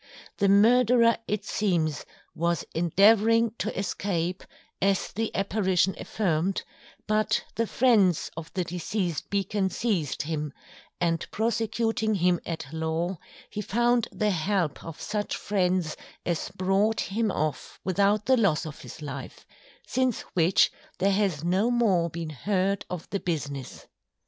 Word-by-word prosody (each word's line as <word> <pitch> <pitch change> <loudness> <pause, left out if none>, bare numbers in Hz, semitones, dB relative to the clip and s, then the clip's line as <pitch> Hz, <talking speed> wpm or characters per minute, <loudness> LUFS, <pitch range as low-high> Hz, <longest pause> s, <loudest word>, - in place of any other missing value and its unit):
The 200 -1 +3
Murderer 230 +3 +5
it 210 -1 -2
seems 165 -7 0 0.3
was 170 -1 0
endeavouring 215 +7 +4
to - - -2
Escape, 185 -2 -2 0.4
as 195 -1 +1
the 225 +2 -2
Apparition 190 -2 +1
affirm'd, 185 -2 -1 0.4
but 215 0 +1
the 230 0 -1
Friends 210 -10 +3
of 160 0 -7
the 185 - +1
Deceased 175 -1 -3
Beacon, 200 0 0
Seized 185 - -1
him; 150 -2 -3 0.5
and 165 -2 0
Prosecuting 225 0 0
him 180 -2 +2
at 165 -3 -4
Law, 160 +2 -2 0.3
he 210 - -3
found 240 +3 +2
the 210 -1 0
help 180 -3 -1
of 165 -2 -8
such 210 -1 -2
Friends 180 -5 0 0.3
as 170 -2 -1
brought 195 +4 +2
him 220 +2 -1
off 155 -7 -3
without 200 +3 +2
the 260 0 +4
loss 185 -8 +2
of 155 -1 -8
his 155 - -10
Life; 140 -2 -7 0.4
since 255 -3 0
which, 175 0 +4 0.3
there 195 +1 +2
has 190 -7 0
no 190 +7 +2
more 200 -9 +2
been 165 -1 -5
heard 195 +5 -1
of 180 -3 -5
the 200 - -1
Business. 145 -7 -4
190 Hz, 135 wpm, -27 LUFS, 170-215 Hz, 0.5 s, Murderer